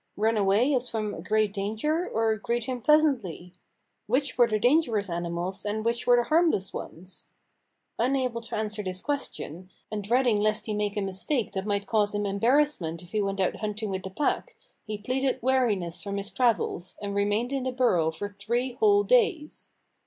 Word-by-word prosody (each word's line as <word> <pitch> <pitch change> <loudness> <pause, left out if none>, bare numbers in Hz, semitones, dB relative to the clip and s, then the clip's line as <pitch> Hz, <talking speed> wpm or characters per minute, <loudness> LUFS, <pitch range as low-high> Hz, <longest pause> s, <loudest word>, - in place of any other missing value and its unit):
Run 220 +2 +2
away 210 +7 +3
as 250 -1 0
from 215 -2 -2
a - - -7
great 215 +2 +1
danger, 220 - -1
or 225 0 +1
greet 235 +3 -2
him 255 -1 -4
pleasantly? 235 - +2 0.5
Which 260 +4 0
were 240 -1 +5
the 215 -2 +1
dangerous 230 - +2
ani 170 0 -2
mals, 180 +3 -3
and 215 +1 -2
which 235 0 0
were 245 - +7
the 240 - +3
harmless 310 - +2
ones? 180 +3 -8 0.7
Unable 250 -1 0
to 230 - -6
answer 215 0 -2
this 185 -2 -4
question, 185 - -4 0.2
and 210 -1 -3
dreading 240 +1 +3
lest 215 0 +1
he 215 - -2
make 210 0 -1
a - - +1
mistake 195 +6 -1
that 190 +1 -3
might 200 -1 0
cause 210 -2 +1
him 205 0 -1
em 200 0 -2
barrassment 235 - +2
if 175 - -15
he 215 - 0
went 195 -1 -2
out 190 - +1
hunting 215 -1 -3
with 190 0 -2
the 190 - -6
pack, 300 - -1 0.3
he 215 -1 -5
pleaded 260 +5 -1
weariness 220 -10 +1
from 200 -1 -4
his 200 0 -4
travels, 225 -7 0
and 200 -1 -4
re 200 0 +2
mained 215 +5 0
in 275 -1 -1
the 255 0 -2
burrow 235 -11 +2
for 160 +5 -4
three 230 +6 -2
whole 410 - +4
days. 420 -12 +1
215 Hz, 195 wpm, -27 LUFS, 200-255 Hz, 0.7 s, were